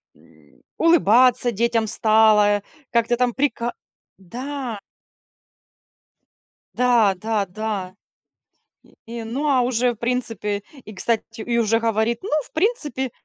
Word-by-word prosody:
м, - - -24 0.2
улыбаться 250 - +4
детям 230 0 0
стала, 215 -1 +3 0.3
как-то 235 0 +1
там 245 -1 +1
прика 240 -3 -1 0.4
да. 245 +4 -6 2.0
Да-да-да. 215 -4 0 1.1
И 230 0 -6
ну, 265 +7 -2
а, 265 -3 +3
уже 245 0 +1
в - - -22
принципе, 225 -4 -2 0.2
и, 215 - -11
кстати, 220 +3 0 0.2
и 235 +1 -1
уже 225 0 +2
говорит: 225 +1 0
"Ну 395 - -6
в - - -18
принципе, 310 - -1
230 Hz, 105 wpm, -22 LUFS, 215-250 Hz, 2.0 s, улыбаться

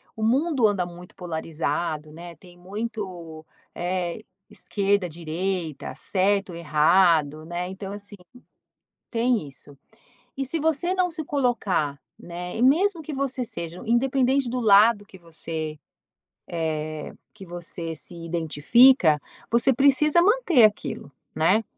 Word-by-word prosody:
o 220 - -8
mundo 265 +1 +3
anda 200 -4 0
muito 175 +1 -12
polarizado, 160 -2 -3
né? 170 +2 -10
Tem 175 0 -17
muito, 185 -4 -6 0.3
eh, 175 0 -3 0.3
esquerda, 200 -3 -1
direita, 170 -1 -4
certo 195 -1 0
e 170 - -7
errado, 155 -1 +3
né, 175 +2 -4
então 190 +1 -7
assim, 205 0 -9 1.0
tem 235 - +1
isso. 140 +1 -12 0.6
E 270 - -2
se 320 +5 -2
você 320 +4 0
não 365 -1 +1
se 320 -1 -5
colocar, 235 - 0 0.2
né 175 +2 -7
e - - -2
mesmo 335 +8 +3
que 305 0 -7
você 270 -2 -2
seja 170 -6 -6
independente 260 +3 +2
do 250 +1 -2
lado 210 0 +5
que 195 - -15
você, 160 -2 -6 0.7
eh, 155 -2 -4 0.2
que 195 - -12
você 170 -1 -5
se 170 +3 -6
identifica, 165 - +4 0.3
você 235 +3 +3
precisa 285 +5 +4
manter 370 - +4
aquilo, 205 -8 -2 0.2
né? 185 +8 +3
190 Hz, 125 wpm, -24 LUFS, 165-250 Hz, 1.0 s, lado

